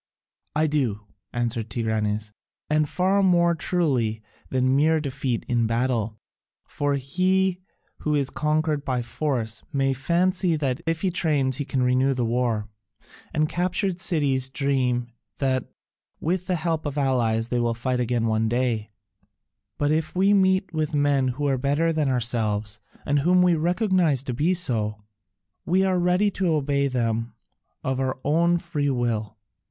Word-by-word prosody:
"I 155 +1 +3
do," 130 -9 0 0.3
answered 115 -2 -2
Tigranes, 110 -2 -1 0.4
"and 155 -1 +2
far 190 +2 +2
more 175 -2 +4
truly 130 -11 0 0.3
than 130 0 +2
mere 155 +3 +3
defeat 135 -4 -3
in 120 -2 +1
battle. 115 -2 -1 0.5
For 145 -1 -1
he 185 +7 +1 0.4
who 150 -1 0
is 140 -2 0
conquered 155 -1 0
by 125 -3 -1
force 120 -3 -2
may 135 -1 +1
fancy 175 +5 +1
that 135 -4 -2
if 165 0 0
he 190 - +1
trains 145 -7 +1
he 145 - -2
can 130 -1 -1
renew 130 +2 +2
the 125 -2 0
war, 115 -3 0 0.6
and 155 0 +1
captured 180 +2 -1
cities 140 -8 +1
dream 130 -3 0 0.3
that 130 -2 0 0.5
with 180 +3 -1
the 185 - +1
help 160 -2 -1
of 145 0 -5
allies 120 -5 +1
they 120 - 0
will 120 -1 0
fight 125 +1 -1
again 120 -1 0
one 110 0 +1
day, 120 -3 -1 0.9
but 145 0 +1
if 160 +2 -1
we 195 +3 +4
meet 190 -2 +2
with 155 -1 -1
men 145 -2 +2
who 130 +4 -2
are 135 -2 +1
better 145 +5 +1
than 155 -3 +1
ourselves 110 -4 -1 0.3
and 145 0 +2
whom 180 +5 +4
we 180 -1 +4
recognise 175 - +1
to 130 - -3
be 155 +9 +1
so, 110 - 0 0.6
we 185 +2 +2
are 185 -1 +2
ready 180 +4 +2
to 190 -1 -1
obey 140 -3 +1
them 115 -3 -1 0.5
of 130 0 -1
our 130 -1 -1
own 170 +4 +3
free 165 -5 -2
will." 115 -4 -2
140 Hz, 155 wpm, -24 LUFS, 120-165 Hz, 0.9 s, more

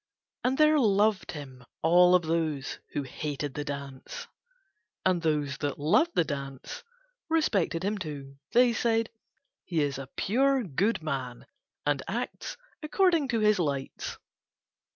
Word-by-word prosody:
And 260 +2 +1
there 305 0 +5
loved 210 -4 +2
him 135 -5 -9 0.2
all 180 +2 +6
of 180 - +3
those 155 -4 -1
who 145 - -1
hated 145 +1 -4
the 145 - -3
dance; 140 -2 -6 0.8
and 185 -2 +3
those 150 -3 0
that 145 -2 -2
loved 245 - +3
the - - +4
dance 140 -3 -6 0.5
respected 205 - +1
him 205 +1 -1
too; 140 -5 -7
they 245 0 +5
said 230 0 +1 0.5
"He 170 -3 -1
is 140 -2 -2
a 135 -1 -7
pure, 265 +5 +2
good 185 +2 0
man 130 -5 -4 0.4
and - - +1
acts - - -4 0.2
according 330 -1 +2
to 230 -3 0
his 210 -2 +4
lights." 140 -5 -2
165 Hz, 135 wpm, -28 LUFS, 140-225 Hz, 0.8 s, all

